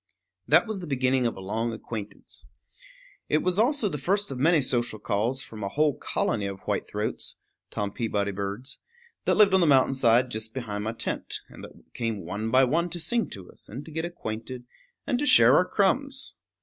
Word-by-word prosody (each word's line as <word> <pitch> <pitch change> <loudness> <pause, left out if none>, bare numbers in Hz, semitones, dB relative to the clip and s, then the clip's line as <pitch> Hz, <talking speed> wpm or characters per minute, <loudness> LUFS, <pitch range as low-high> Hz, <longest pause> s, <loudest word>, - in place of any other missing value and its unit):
That - - +5
was 215 -3 -4
the 175 - -7
beginning 130 -2 +1
of 115 - -4
a - - -7
long 110 +5 -2
acquaintance. 110 -2 -8 0.8
It 155 - +2
was 185 +2 +1
also 245 0 +3
the 150 -7 -4
first 195 +5 0
of 130 - -5
many 160 +4 +4
social 120 -4 0
calls 110 +6 -1
from 110 -2 -9
a 100 - -2
whole 150 +3 +2
colony 105 -4 -1
of 95 -1 -7
white - - -2
throats - - -4 0.3
(Tom 100 -1 -3
Peabody 105 -3 -1
birds) 100 +6 -6 0.5
that - - +3
lived 205 -2 +6
on 190 - +5
the 170 - +4
mountain 135 -2 +5
side 125 -1 +3
just 110 +1 -3
behind 105 -5 -4
my 110 - -2
tent, 115 - -4
and - - -12
that - - -14
came 110 -6 -3
one 100 +5 -3
by 130 +3 +5
one 165 +7 +1
to 175 +1 -5
sing 235 +7 0
to 95 -3 -8
us, - - -14
and 135 +7 -7
to 160 - -11
get 160 +1 -3
acquainted, 125 -7 -6 0.4
and 250 -4 0
to 295 - 0
share 120 - +7
our 180 - +5
crumbs. 265 +9 0
130 Hz, 200 wpm, -26 LUFS, 110-170 Hz, 0.8 s, share